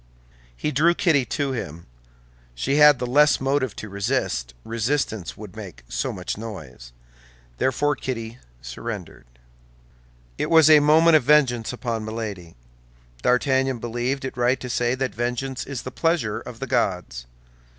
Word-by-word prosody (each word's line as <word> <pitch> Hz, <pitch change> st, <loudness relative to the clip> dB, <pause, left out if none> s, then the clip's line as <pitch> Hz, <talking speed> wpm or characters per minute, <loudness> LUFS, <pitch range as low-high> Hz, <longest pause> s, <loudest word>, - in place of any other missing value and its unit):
He 150 Hz, -, -2 dB
drew 165 Hz, +5 st, +3 dB
Kitty 150 Hz, -9 st, +2 dB
to 140 Hz, +2 st, -2 dB
him. 85 Hz, -, -6 dB, 0.7 s
She 135 Hz, -, 0 dB
had 150 Hz, -2 st, +7 dB
the 125 Hz, -, -3 dB
less 145 Hz, +4 st, +4 dB
motive 135 Hz, -3 st, 0 dB
to 110 Hz, -, -7 dB
resist, 100 Hz, -, -2 dB
resistance 115 Hz, -, -2 dB
would -, -, -10 dB
make -, -, -9 dB
so -, -, -2 dB
much 90 Hz, +2 st, -5 dB
noise. 75 Hz, -, -9 dB, 0.7 s
Therefore 145 Hz, +3 st, +1 dB
Kitty 115 Hz, -3 st, -5 dB, 0.2 s
surrendered. -, -, -7 dB, 1.1 s
It -, -, -1 dB
was 160 Hz, -2 st, +6 dB
a 155 Hz, -, +9 dB
movement 155 Hz, +2 st, +6 dB
of 150 Hz, -, -2 dB
vengeance 130 Hz, -6 st, +3 dB
upon 120 Hz, -3 st, -3 dB
Milady. 105 Hz, -6 st, -6 dB, 0.7 s
D'Artagnan 130 Hz, -, +2 dB
believed 120 Hz, +4 st, -3 dB
it 130 Hz, -, -5 dB
right 125 Hz, +2 st, +2 dB
to 125 Hz, 0 st, -5 dB
say 120 Hz, +1 st, +1 dB
that 130 Hz, 0 st, -2 dB
vengeance 125 Hz, +3 st, -3 dB
is 135 Hz, -3 st, -5 dB
the 130 Hz, -, -6 dB
pleasure 155 Hz, -9 st, 0 dB
of 115 Hz, -, -10 dB
the 135 Hz, -, -3 dB
gods. 90 Hz, -, -1 dB
125 Hz, 145 wpm, -23 LUFS, 110-140 Hz, 1.1 s, a